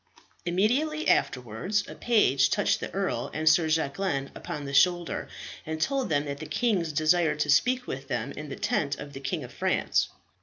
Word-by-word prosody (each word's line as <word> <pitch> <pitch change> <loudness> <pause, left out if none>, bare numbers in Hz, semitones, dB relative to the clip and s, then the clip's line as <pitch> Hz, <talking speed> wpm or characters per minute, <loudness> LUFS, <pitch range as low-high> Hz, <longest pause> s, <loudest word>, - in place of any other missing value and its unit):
Immediately 260 - +1
afterwards 130 - 0
a - - -8
page 140 - +3
touched 205 +5 +1
the - - -5
earl 195 -1 -2
and 155 +1 -2
Sir 160 +1 +5
Jacquelin 155 -1 -1
upon 145 -1 -6
the 140 - -6
shoulder, 175 +3 +2 0.4
and 160 0 -4
told 270 - 0
them 145 -2 +1
that 140 -1 -5
the 155 - -7
kings 195 -10 0
desired 155 +1 +2
to 150 - +2
speak 250 - +3
with 135 - -6
them 125 0 -2
in 150 -1 -7
the 135 - -5
tent 140 -1 -1
of 145 -1 -9
the 135 - -7
King 140 +3 -3
of 125 -1 -10
France. - - +1
155 Hz, 185 wpm, -27 LUFS, 140-195 Hz, 0.4 s, Sir